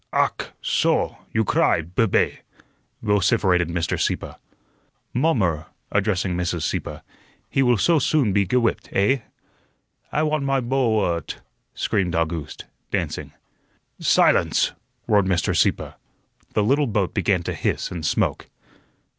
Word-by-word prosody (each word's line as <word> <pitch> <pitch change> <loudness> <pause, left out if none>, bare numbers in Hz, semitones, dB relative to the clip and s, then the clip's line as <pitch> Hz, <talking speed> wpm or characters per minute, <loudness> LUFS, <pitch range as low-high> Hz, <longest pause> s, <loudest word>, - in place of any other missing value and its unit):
"Ach, - - 0 0.2
soh; - - +1
you 110 - +1
cry, 80 - +2
bube!" 90 +5 +1 0.6
vociferated 95 -4 +2
Mr. 85 -1 -1
Sieppe. - - -1 0.8
"Mommer," 100 - +1 0.2
addressing 100 -3 0
Mrs. 85 -2 -2
Sieppe, - - -3 0.5
"he 135 - +2
will 125 -3 +4
soh 165 - +3
soon 130 -6 +2
be 100 0 +3
ge 115 - -1
whipt, 120 -2 +1
eh?" 105 +8 +3 0.9
"I 150 - +1
want 155 -2 0
my 135 0 +1
boa 120 -7 +1
wut," 85 -3 -5 0.4
screamed 90 -4 0
August, 80 -2 -3 0.2
dancing. - - -3 0.7
"Silence!" - - +3 0.3
roared 100 -2 +3
Mr. 90 -4 +1
Sieppe. - - +1 0.6
The 105 - +3
little 140 +6 +2
boat 100 -4 -1
began 95 -4 +1
to - - -3
hiss - - -2
and 85 -3 -5
smoke. - - 0
100 Hz, 125 wpm, -23 LUFS, 90-125 Hz, 0.9 s, will